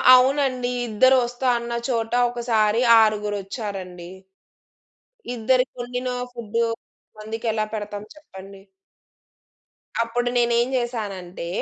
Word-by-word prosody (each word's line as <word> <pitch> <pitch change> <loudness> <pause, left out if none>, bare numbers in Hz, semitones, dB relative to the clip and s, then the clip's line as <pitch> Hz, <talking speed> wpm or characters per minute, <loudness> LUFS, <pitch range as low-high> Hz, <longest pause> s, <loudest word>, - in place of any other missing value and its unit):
అవునండి. 255 -1 +2 0.2
ఇద్దరు 260 +5 +4
వస్తా 245 +2 -3
అన్న 235 0 -5 0.2
చోట 225 -2 -1 0.2
ఒకసారి 230 -2 +1 0.2
ఆరుగురొచ్చారండి. 200 -4 -2 1.3
ఇద్దరి 250 +3 +2
కొండిన 245 +1 -4 0.2
ఫుడ్డు 230 -1 -1 0.5
మందికి 220 +2 -5
ఎలా 215 -1 0
పెడతాం 205 -1 -5
చెప్పండి? 195 -9 -13 1.4
అప్పుడు 240 +1 -1
నేనేం 235 0 +3
చేశానంటే 200 -8 -4
230 Hz, 90 wpm, -23 LUFS, 205-245 Hz, 1.4 s, ఇద్దరు